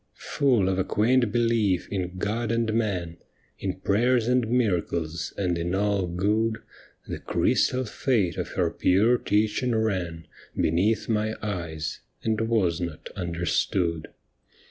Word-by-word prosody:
Full 125 -9 +1
of 95 0 0
a - - +3
quaint 120 +3 +2
belief 115 -5 +1
in 90 -2 -3
God 110 +4 -1
and 115 -1 0
man. 95 -7 -1 0.4
In 95 -1 -4
prayers 120 +4 +2
and 125 -2 +2
miracles, 85 -8 0
and 90 -4 0
in 85 +2 -1
all 100 -2 +1
good. 105 +6 0 0.5
The - - -5
crystal 130 0 +1
fate 105 - 0
of - - -4
her - - +1
pure 110 +7 +3
teaching 110 +4 +1
ran 90 -7 -1 0.3
Beneath 95 +8 +1
my 110 0 0
eyes, 85 -6 -4 0.2
and 110 -1 0
was 105 -7 +1
not 85 -3 -5
understood. 85 -1 -1
100 Hz, 130 wpm, -26 LUFS, 90-115 Hz, 0.5 s, a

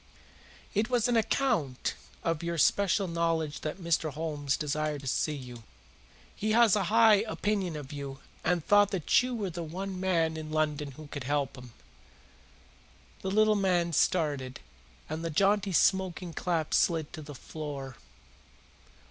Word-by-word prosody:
"It 215 +3 +1
was 245 -2 +2
on 245 - +1
account 215 - +1 0.3
of 165 -2 0
your 170 0 -2
special 200 +5 +3
knowledge 165 -3 -1
that 155 +2 -4
Mr. 170 -3 0
Holmes 150 -2 -2
desired 150 0 -2
to 135 - -8
see 150 +4 0
you. 125 -4 -9 0.7
He 215 +1 -1
has 230 -3 +6
a 200 -3 +1
high 220 +2 +6
opinion 200 -6 -1
of 145 -1 -7
you 140 -2 -6 0.3
and 170 -1 +1
thought 205 -1 +5
that 190 0 +3
you 250 0 -3
were 200 -5 -3
the 170 +1 -5
one 185 +4 -5
man 165 -4 +1
in 155 -1 -6
London 150 -2 -1
who 155 +4 -11
could 145 -2 -7
help 145 -1 -1
him." 125 -3 -12 1.5
The 190 - -2
little 215 +2 +4
man 180 -4 +1
started, 145 -6 +1 0.5
and 160 +2 -4
the 165 - -2
jaunty 200 +4 +2
smoking 180 0 +1
cap 165 -3 -1
slid 160 -4 +2
to 160 - -7
the 145 -1 -9
floor. 140 -3 -7
165 Hz, 155 wpm, -29 LUFS, 150-195 Hz, 1.5 s, has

